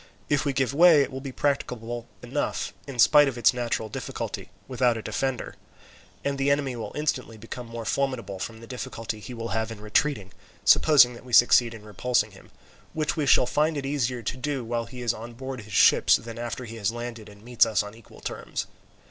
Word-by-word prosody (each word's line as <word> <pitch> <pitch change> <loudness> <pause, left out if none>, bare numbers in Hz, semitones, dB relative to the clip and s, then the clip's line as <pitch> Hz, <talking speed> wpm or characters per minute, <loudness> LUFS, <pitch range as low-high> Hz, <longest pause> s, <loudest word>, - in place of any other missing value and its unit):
If 145 0 +1
we 140 - +1
give 135 -1 0
way 160 -1 +7
it - - -5
will 130 0 -6
be 135 -1 -6
practicable 120 -4 -2 0.2
enough, - - -2
in 135 -3 -7
spite 145 +4 +7
of 130 -3 -3
its 120 - +4
natural 120 -2 -2
difficulty, - - -5 0.2
without 125 -2 +1
a 110 - -6
defender; 135 -2 -3 0.7
and 140 -1 -1
the 135 +1 +2
enemy 140 -3 +1
will 115 - -6
instantly 130 -6 -2
become 115 +2 -8
more 115 0 -7
formidable 120 -6 -2
from 110 +4 -6
the - - -10
difficulty 115 -2 -5
he 120 +4 -8
will 115 0 -5
have 110 +1 -1
in 110 - -8
retreating, 105 -1 0 0.3
supposing 135 -6 +6
that 120 - -12
we 125 -1 -12
succeed 120 0 +6
in 105 -1 -12
repulsing 105 +1 0
him, 95 - -16 0.4
which 155 -1 -1
we 150 -4 -1
shall 125 - +6
find 150 +4 +1
it 140 - -3
easier 130 -4 -1
to 110 - -3
do, 135 0 -2
while 115 0 -2
he 125 0 -8
is 120 -1 +1
on 115 +2 -9
board 130 0 -6
his 105 -1 -12
ships, - - +6
than 115 +1 -6
after 120 +1 -4
he 115 0 -8
has 105 0 0
landed 120 -2 -7
and 100 0 -16
meets 120 -1 +3
us 110 -2 +1
on 105 0 -9
equal 115 -2 -16
terms. - - -4
120 Hz, 210 wpm, -26 LUFS, 115-135 Hz, 0.7 s, way